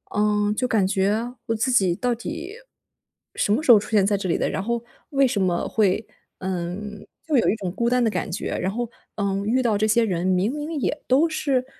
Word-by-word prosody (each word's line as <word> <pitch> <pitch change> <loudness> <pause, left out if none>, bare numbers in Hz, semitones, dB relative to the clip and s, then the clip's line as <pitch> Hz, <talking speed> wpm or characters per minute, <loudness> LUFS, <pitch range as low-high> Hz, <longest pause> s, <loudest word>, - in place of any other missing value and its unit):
嗯， 210 0 +2
就 250 +3 0
感 215 -5 +2
觉， 210 +5 0
我 225 - 0
自 240 +4 0
己 190 -8 +3
到 245 +3 0
底 330 - -6 0.8
什 205 - 0
么 250 - +1
时 250 - +6
候 215 - +9
出 - - -8
现 205 -3 +4
在 205 0 +2
这 190 -2 -3
里 - - +2
的， - - 0
然 - - -2
后 235 +1 -2 0.3
为 275 -1 +3
什 205 -4 -1
么 175 -2 0
会 215 0 +1 0.3
嗯， 190 +3 -5 0.2
就 310 -3 0
有 - - +3
一 - - +2
种 190 -5 -4
孤 235 +2 0
单 250 0 +2
的 225 - +3
感 - - -3
觉。 190 - -3
然 190 - 0
后， 240 +1 -3 0.3
嗯， 200 -1 -1
遇 250 +4 +2
到 225 -3 +2
这 215 +1 +1
些 230 +2 +3
人 180 -4 -1
明 190 +7 +1
明 300 +2 -5
也 295 - -2
都 280 +6 +4
是， 270 -5 0
215 Hz, 245 characters per minute, -23 LUFS, 195-250 Hz, 0.8 s, 候